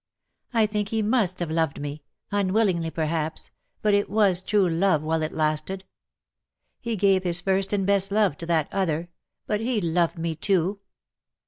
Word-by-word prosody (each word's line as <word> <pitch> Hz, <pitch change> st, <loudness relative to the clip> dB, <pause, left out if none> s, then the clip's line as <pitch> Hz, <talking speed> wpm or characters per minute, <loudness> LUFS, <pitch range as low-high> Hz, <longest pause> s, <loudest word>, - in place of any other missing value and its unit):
'' -, -, -54 dB
I 225 Hz, -1 st, +5 dB
think 210 Hz, -1 st, -2 dB
he 220 Hz, -1 st, 0 dB
must 210 Hz, -5 st, +1 dB
have 170 Hz, -2 st, -2 dB
loved 160 Hz, -3 st, 0 dB
me 145 Hz, +1 st, -5 dB, 0.2 s
— -, -, -47 dB
unwillingly, 195 Hz, -4 st, +1 dB
perhaps 160 Hz, 0 st, -3 dB
— -, -, -49 dB
but 210 Hz, -1 st, +3 dB
it 205 Hz, 0 st, +2 dB
was 200 Hz, -3 st, +3 dB
true 200 Hz, 0 st, +2 dB
love 170 Hz, -2 st, +2 dB
while 160 Hz, +1 st, 0 dB
it 155 Hz, -, -2 dB
lasted. 155 Hz, +5 st, -1 dB, 0.9 s
He 235 Hz, -1 st, -3 dB
gave 195 Hz, -2 st, +3 dB
his 175 Hz, -1 st, +1 dB
first 195 Hz, +1 st, 0 dB
and 200 Hz, -2 st, +1 dB
best 195 Hz, 0 st, +2 dB
love 205 Hz, -7 st, +2 dB
to 165 Hz, -, -7 dB
that 160 Hz, -3 st, +2 dB
other 175 Hz, -3 st, -1 dB, 0.2 s
— -, -, -61 dB
but 210 Hz, 0 st, -1 dB
he 235 Hz, -1 st, 0 dB
loved 170 Hz, -1 st, 0 dB
me 165 Hz, 0 st, -2 dB
too. 190 Hz, +3 st, 0 dB
185 Hz, 190 wpm, -25 LUFS, 165-205 Hz, 0.9 s, I